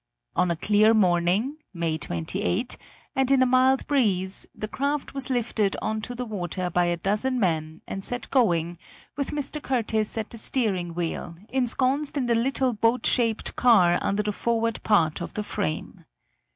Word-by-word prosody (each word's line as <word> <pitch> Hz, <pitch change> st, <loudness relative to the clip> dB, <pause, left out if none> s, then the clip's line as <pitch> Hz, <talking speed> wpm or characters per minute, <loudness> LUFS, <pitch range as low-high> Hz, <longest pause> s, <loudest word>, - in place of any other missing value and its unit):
On 180 Hz, -, +2 dB
a 170 Hz, -, +1 dB
clear 215 Hz, +5 st, +4 dB
morning 190 Hz, -, +2 dB, 0.2 s
(May 165 Hz, -2 st, -1 dB
28), 85 Hz, -, -2 dB, 0.4 s
and 265 Hz, -1 st, +2 dB
in 270 Hz, -1 st, +5 dB
a -, -, +4 dB
mild 255 Hz, +1 st, +3 dB
breeze, 195 Hz, -9 st, 0 dB
the 215 Hz, -, -4 dB
craft 280 Hz, +5 st, -2 dB
was 275 Hz, -1 st, -2 dB
lifted 230 Hz, -5 st, 0 dB
onto 220 Hz, +3 st, -3 dB
the 250 Hz, +1 st, -4 dB
water 185 Hz, -4 st, -3 dB
by 175 Hz, +1 st, +2 dB
a 175 Hz, 0 st, 0 dB
dozen 210 Hz, +8 st, 0 dB
men 160 Hz, -5 st, -1 dB
and 195 Hz, -, -5 dB
set 245 Hz, +3 st, -1 dB
going, 175 Hz, -, +2 dB, 0.4 s
with 280 Hz, -1 st, -2 dB
Mr. 295 Hz, +1 st, -3 dB
Curtiss 225 Hz, -5 st, -1 dB
at 220 Hz, -1 st, -3 dB
the 230 Hz, -, -4 dB
steering 190 Hz, -9 st, -1 dB
wheel, 170 Hz, -1 st, -3 dB
ensconced 265 Hz, +3 st, 0 dB
in 265 Hz, -, 0 dB
the 240 Hz, -, +2 dB
little 255 Hz, +2 st, +1 dB
boat 230 Hz, +2 st, +1 dB
shaped 230 Hz, -3 st, +1 dB
car 185 Hz, -8 st, +5 dB
under 205 Hz, +1 st, 0 dB
the 210 Hz, -, -1 dB
forward 230 Hz, +1 st, -1 dB
part 165 Hz, -8 st, +2 dB
of -, -, -6 dB
the 210 Hz, -, -2 dB
frame. 80 Hz, -, -4 dB
220 Hz, 165 wpm, -25 LUFS, 180-255 Hz, 0.4 s, in